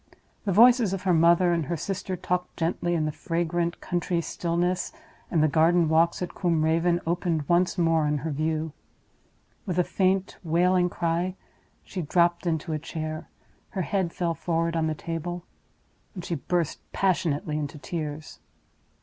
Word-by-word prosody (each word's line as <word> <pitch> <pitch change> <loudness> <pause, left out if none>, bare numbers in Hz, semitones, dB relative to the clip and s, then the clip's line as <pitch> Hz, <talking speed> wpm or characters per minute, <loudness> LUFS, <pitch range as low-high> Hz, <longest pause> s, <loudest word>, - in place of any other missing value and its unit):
The 200 - +1
voices 235 0 +6
of 190 -1 -3
her 185 -2 +3
mother 170 +2 +5
and 165 -4 -1
her 170 - -1
sister 190 +2 -3
talked 180 0 -3
gently 175 +1 0
in 155 -2 +1
the 155 - -1
fragrant 170 0 -1
country 175 -1 -1
stillness, 175 +2 -1 0.4
and 160 -4 +2
the - - +5
garden 165 +2 +3
walks 165 +3 +3
at 180 - -5
Combe 165 -4 +1
Raven 170 +2 +2
opened 165 -3 -1
once 175 +2 +2
more 165 -3 +3
on 150 0 +1
her 160 - -1
view. 155 +1 -1 0.9
With 180 -2 -2
a 180 - +4
faint, 190 +1 0
wailing 180 +2 +3
cry, 175 +2 -1 0.5
she 185 - -5
dropped 170 +2 +2
into 160 0 -1
a 155 - -1
chair; 155 0 -5 0.4
her 190 - -2
head 185 +1 -1
fell 170 -1 -1
forward 165 0 -1
on 160 -1 +1
the 155 - -1
table, 170 +2 -4 0.7
and 180 -2 -6
she - - -3
burst 170 +1 -1
passionately 155 -5 0
into 145 0 -4
tears. 155 -1 -5
170 Hz, 160 wpm, -26 LUFS, 160-180 Hz, 0.9 s, voices